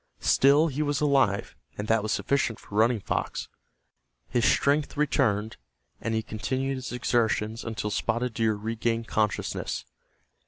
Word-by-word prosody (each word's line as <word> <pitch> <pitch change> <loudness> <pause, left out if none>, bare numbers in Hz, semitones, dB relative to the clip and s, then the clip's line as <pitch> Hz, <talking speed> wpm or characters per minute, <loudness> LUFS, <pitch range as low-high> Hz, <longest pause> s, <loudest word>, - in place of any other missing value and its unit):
Still 140 +4 +5
he 150 -2 -2
was 145 -2 0
alive, 135 -9 +2 0.2
and 105 - -4
that 115 0 +3
was 110 0 -2
sufficient 135 -4 0
for - - -15
Running 110 +1 +3
Fox. - - -3 0.8
His 120 0 +3
strength 145 +1 +1
returned, 110 -7 +1 0.4
and 115 0 -1
he 110 - 0
continued 130 +6 -2
his 125 -3 -6
exertions 115 -2 0
until 110 -2 -3
Spotted 115 +3 -1
Deer 110 -1 +1
regained 115 +2 -2
consciousness. 105 -1 -1
115 Hz, 135 wpm, -27 LUFS, 110-135 Hz, 0.8 s, Still